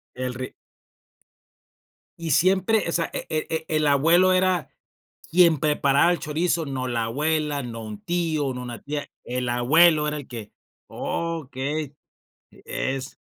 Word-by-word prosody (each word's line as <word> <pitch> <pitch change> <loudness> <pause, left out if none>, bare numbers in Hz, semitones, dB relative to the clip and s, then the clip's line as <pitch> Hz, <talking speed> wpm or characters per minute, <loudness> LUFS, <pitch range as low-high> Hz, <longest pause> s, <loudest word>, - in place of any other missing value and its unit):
El 125 0 -3
ri 130 +1 -6 1.7
Y 165 -2 -1
siempre, 190 - +3
o - - -1
sea, 165 -1 0
e - - -4
e 155 -1 -1 0.2
e 155 - 0
el 155 -1 +2
abuelo 165 +6 +5
era 185 -5 +2 0.6
quien 170 -2 +5
preparaba 150 +1 +3
el 175 - -1
chorizo, 160 +2 -1
no 130 -2 -3
la 120 -2 -1
abuela, 150 +4 -1
no 115 -2 -6
un 105 -1 -8
tío, 160 -5 -1
no 125 - -5
una 120 -2 -7
tía, 145 0 -4 0.2
el 125 0 -3
abuelo 150 +6 +4
era 150 - -2
el 145 -3 -7
que 115 -4 -8 0.4
okey, 150 -2 -3 0.6
e 135 - -4
es 135 +1 -7
150 Hz, 150 wpm, -24 LUFS, 130-165 Hz, 1.7 s, abuelo